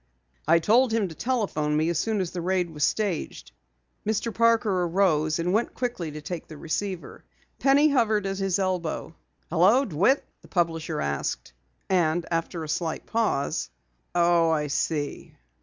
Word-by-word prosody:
"I 165 +2 +6
told 230 +9 +3
him 220 -4 +1
to - - -8
telephone 160 -10 -1
me 155 +1 +1
as 170 -2 0
soon 220 -1 0
as 180 - -3
the 180 - -4
raid 180 -1 0
was 150 -2 -3
staged." 160 - -1 0.5
Mr. 220 +1 -1
Parker 225 -4 +3
arose 165 -4 +2
and 175 +2 -1
went 225 +3 0
quickly 240 -10 -3
to 150 0 -8
take 175 -1 -5
the 155 - -10
receiver. 180 +4 -4 0.4
Penny 280 +3 +5
hovered 220 -7 +2
at 195 0 -2
his 195 -1 +1
elbow. 185 -5 -2 0.4
"Hello! 195 +11 +4
DeWitt?" 195 - +2 0.2
the - - -16
publisher 165 - -1
asked, 70 -3 -3 0.3
and 175 -2 +1
after 165 0 -2
a - - -6
slight 160 +1 -2
pause: 220 -11 -1 0.5
"Oh, 170 -1 +4
I 155 -2 +1
see. 145 +1 -2
175 Hz, 155 wpm, -26 LUFS, 160-215 Hz, 0.5 s, I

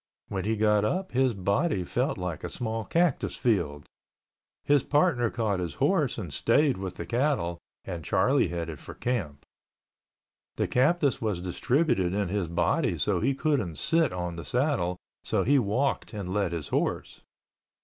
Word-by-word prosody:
When 95 -2 -3
he 110 +1 +1
got 105 -1 +3
up 185 - -1
his 130 -2 +2
body 100 - 0
felt 125 - -1
like 90 -4 -4
a - - -3
small 115 -1 -3
cactus 170 -4 +1
field. 85 - 0 0.8
His 145 -1 +4
partner 145 -6 +2
caught 110 -5 -1
his 85 -4 -4
horse - - +1
and - - -5
stayed 145 -5 +3
with 95 -2 -5
the - - -6
cattle, 120 - 0 0.3
and 85 -2 -5
Charlie - - +2
headed 85 -3 -4
for - - -10
camp. 95 - -3 1.1
The - - 0
cactus 145 +2 +2
was 105 -6 -1
distributed 95 - +1
in 100 -3 0
his 100 -2 -1
body 85 - +1
so - - +1
he 135 - +1
couldn't 130 - 0
sit 165 - +2
on 90 -1 -4
the 85 - -5
saddle, 120 - 0 0.3
so - - +1
he 140 +3 +4
walked 125 +6 0
and 95 -3 -4
led 100 -4 0
his 80 -5 -4
horse. - - -2
105 Hz, 160 wpm, -28 LUFS, 90-135 Hz, 1.1 s, His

